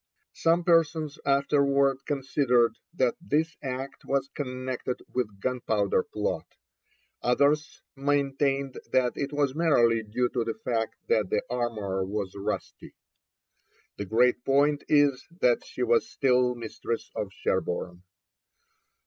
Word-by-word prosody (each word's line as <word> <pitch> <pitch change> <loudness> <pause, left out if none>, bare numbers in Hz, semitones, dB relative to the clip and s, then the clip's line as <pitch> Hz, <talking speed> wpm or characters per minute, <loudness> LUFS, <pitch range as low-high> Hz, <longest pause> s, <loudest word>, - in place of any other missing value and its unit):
Some 165 +1 +2
persons 160 -3 +2
afterwards 140 -1 +3
considered 130 -5 +1
that 130 -8 +1
this 160 -1 0
act 130 +1 -5
was 135 0 -1
connected 130 -2 -4
with 105 -6 -2
Gunpowder 110 -4 0
Plot, - - -4 0.7
others 145 +5 +1
maintained 140 -1 0
that 125 -1 +2
it 140 0 -3
was 145 -2 +1
merely 120 -8 +3
due 115 +3 -1
to 120 -3 -1
the 115 0 -3
fact 115 -2 -2
that 105 -4 +2
the 105 - 0
armour 110 -6 -1
was 100 0 -3
rusty. 100 0 -5 1.0
The 100 - -4
great 120 +4 +3
point 145 +2 +2
is 145 -3 +3
that 120 -1 +3
she 125 - -4
was 120 -1 +2
still 125 -2 +2
mistress 115 0 -5
of 100 -2 -4
Sherborne. 90 -2 -2
130 Hz, 120 wpm, -27 LUFS, 115-140 Hz, 1.0 s, afterwards